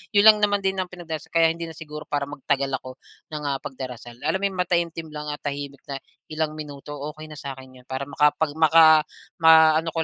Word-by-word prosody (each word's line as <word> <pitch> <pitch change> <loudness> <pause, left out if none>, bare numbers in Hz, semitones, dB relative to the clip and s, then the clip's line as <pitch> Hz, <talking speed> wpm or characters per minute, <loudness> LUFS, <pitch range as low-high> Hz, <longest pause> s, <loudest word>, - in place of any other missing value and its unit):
'yun 205 - +6
lang 215 -1 +9
naman 205 -1 +3
din 190 0 +1
ang 185 - -1
pinagdarasal 165 -3 -7
kaya 165 -1 +4
hindi 165 0 -6
na 165 - -10
siguro 150 -1 -8
para 145 -1 -1
magtagal 140 -1 -1
ako 130 0 -10 0.4
ng, 150 -1 -5
ah, 135 -1 -1
pagdarasal. 125 -3 -8
Alam 190 - +1
mo - - +4
yung 185 - -8
mataimtim 170 -2 -1
lang 150 -1 -6
at 145 - -6
tahimik 140 -1 -6
na 140 - -4 0.3
ilang 155 0 -2
minuto, 145 -2 -9 0.2
okey 155 0 -10
na 150 - -9
sa 140 -2 -6
akin 130 -1 -14
'yun 125 - -20
para 130 +1 -3
makapag 150 +1 +2
maka 160 0 +7 0.4
maano 160 0 +6
ko 165 - +1
155 Hz, 215 wpm, -24 LUFS, 140-165 Hz, 0.4 s, lang